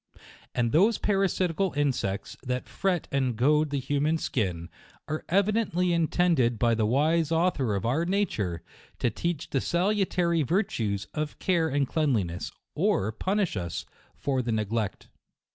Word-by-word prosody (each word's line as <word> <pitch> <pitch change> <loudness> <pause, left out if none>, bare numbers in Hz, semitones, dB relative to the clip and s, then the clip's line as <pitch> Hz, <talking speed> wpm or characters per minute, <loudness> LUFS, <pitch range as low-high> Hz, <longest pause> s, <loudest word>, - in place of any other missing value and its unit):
And 120 -2 +1
those 200 - +4
parasitical 195 -2 +1
insects 125 -9 -1
that 125 -1 -3
fret 185 -4 -1
and 130 -3 0
goad 150 +6 +3
the 140 -1 -1
hu 140 +2 -1
man 155 +3 +2
skin, 90 - -2 0.4
are 155 +1 -3
evidently 195 -2 +2
intended 165 -7 +2
by 120 +1 +3
the 110 -2 +1
wise 155 +6 +2
Author 160 - +1
of 100 - -2
our 135 +8 +1
nature, 170 - -1 0.3
to 120 - 0
teach 170 +6 -3
the 135 - +1
salutary 180 -2 +1
virtues 120 - 0
of 150 -1 -3
care 170 -4 +1
and 140 -1 +1
cleanliness, 115 - 0 0.2
or 100 +3 +1
punish 190 - -1
us 85 -3 -4 0.3
for 135 -2 -1
the 120 -1 -2
neglect. 110 -1 -2
145 Hz, 145 wpm, -27 LUFS, 115-175 Hz, 0.4 s, those